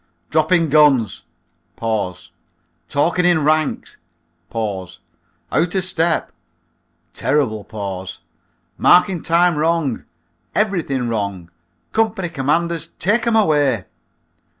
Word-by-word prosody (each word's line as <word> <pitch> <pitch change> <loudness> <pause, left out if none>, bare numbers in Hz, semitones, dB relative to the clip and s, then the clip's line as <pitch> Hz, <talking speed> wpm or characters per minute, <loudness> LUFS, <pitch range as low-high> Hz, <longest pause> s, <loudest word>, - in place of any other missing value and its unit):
Dropping 165 +1 +2
guns! 140 -8 +3 0.6
Talking 90 - -3
in 175 -3 +3
ranks! 155 0 0 0.6
Out 95 -5 -3 0.6
o 165 - +2
step 175 -3 0 0.8
(terrible 130 -6 0
pause). 95 -4 -6 0.6
Marking 180 -1 +4
time 170 0 +2
wrong. 160 -5 0 0.5
Everything 165 - 0
wrong! 100 -6 -3 0.4
Company 220 -5 0
commanders, 165 +3 -1
take 220 +5 +1
'em 230 - +2
away." 145 - +2
150 Hz, 80 wpm, -19 LUFS, 105-170 Hz, 0.8 s, Marking